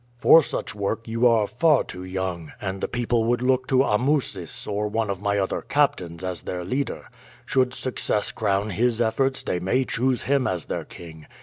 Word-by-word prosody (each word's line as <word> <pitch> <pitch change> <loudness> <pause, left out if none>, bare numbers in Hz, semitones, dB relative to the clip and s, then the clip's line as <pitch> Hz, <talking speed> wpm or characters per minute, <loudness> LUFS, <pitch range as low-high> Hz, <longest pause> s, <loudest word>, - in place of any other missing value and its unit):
"For 165 +6 +7
such - - -4
work 105 +3 -3
you 115 +2 +3
are 115 -3 +4
far 155 +6 +3
too 90 - -8
young, 90 -3 -4
and 95 -1 -4
the - - 0
people 120 -1 0
would 120 +1 +1
look 130 0 +2
to 130 0 +4
Amusis 115 - 0
or 105 0 -1
one 110 0 -1
of 95 -1 -5
my 100 0 0
other 95 -1 -1
captains 90 - 0
as 90 -3 -4
their 90 -1 -5
leader. 135 +9 -3 0.4
Should 130 -1 +1
success 120 -4 -1
crown 100 +2 0
his 115 +4 +1
efforts 130 +4 +1
they 90 - -1
may 125 +9 +1
choose 125 +1 0
him 140 -1 +1
as 90 -4 -2
their - - -4
king. 80 -3 -12
110 Hz, 190 wpm, -24 LUFS, 95-130 Hz, 0.4 s, For